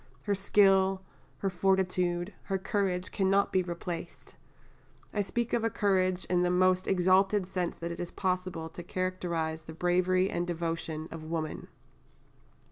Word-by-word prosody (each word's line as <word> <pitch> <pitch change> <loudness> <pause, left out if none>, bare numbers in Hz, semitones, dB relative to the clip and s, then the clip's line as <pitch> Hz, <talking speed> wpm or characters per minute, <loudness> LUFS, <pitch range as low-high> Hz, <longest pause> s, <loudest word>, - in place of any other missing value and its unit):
her 205 - 0
skill, 195 -1 +3 0.3
her 195 - -1
fortitude, 180 0 +1
her 195 - 0
courage 190 -2 -1
cannot 195 0 +2
be 185 - +4
replaced. 175 -1 -6 0.8
I 205 - +1
speak 235 +4 -2
of 235 - +2
courage 185 -2 +2
in 180 0 +1
the 180 - +2
most 185 +1 +3
exalted 190 +2 +3
sense 180 -2 -2
that 170 0 -4
it 170 - -6
is 175 - -3
possible 185 -3 -2
to 170 - -8
characterise 170 -3 -2
the 160 - -8
bravery 180 +2 +2
and 175 -2 -2
devotion 165 -2 -3
of 165 -1 -7
woman." 160 -1 -4
185 Hz, 140 wpm, -30 LUFS, 175-190 Hz, 0.8 s, be